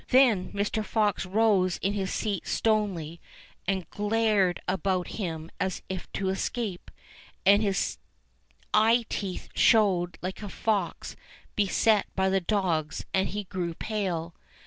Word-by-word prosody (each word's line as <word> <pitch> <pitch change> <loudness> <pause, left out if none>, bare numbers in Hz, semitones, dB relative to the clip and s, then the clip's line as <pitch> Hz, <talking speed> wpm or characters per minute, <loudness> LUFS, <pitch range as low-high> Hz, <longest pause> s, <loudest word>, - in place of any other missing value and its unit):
238 260 -1 +6
ENGLISH 195 -4 -2
FAIRY 185 - -9
TALES 205 +1 0
Then 220 - 0
Mr. - - -11
Fox 210 -5 +1
rose 195 -3 +3
in 195 +2 +1
his 195 -2 -2
seat 205 -5 -2
stonily 190 -7 0 0.5
and 190 -3 -1
glared 210 -3 +2
about 185 -1 0
him 165 -5 -4
as 190 -1 -2
if 190 -1 -5
to 190 -1 -1
escape, 195 0 -3 0.6
and 200 +2 +6
his 195 - 0 0.7
eye 225 +2 +4
teeth 190 -3 -4
showed 185 -6 +4
Hke 185 +3 -4
a 205 - -5
fox 210 +1 -2 0.4
beset 210 +1 +3
by 190 0 +2
the 190 0 +2
dogs, 170 -6 -1
and 190 0 +2
he 205 +1 -3
grew 180 -3 -4
pale. 180 -7 -2
195 Hz, 145 wpm, -28 LUFS, 180-210 Hz, 0.7 s, 238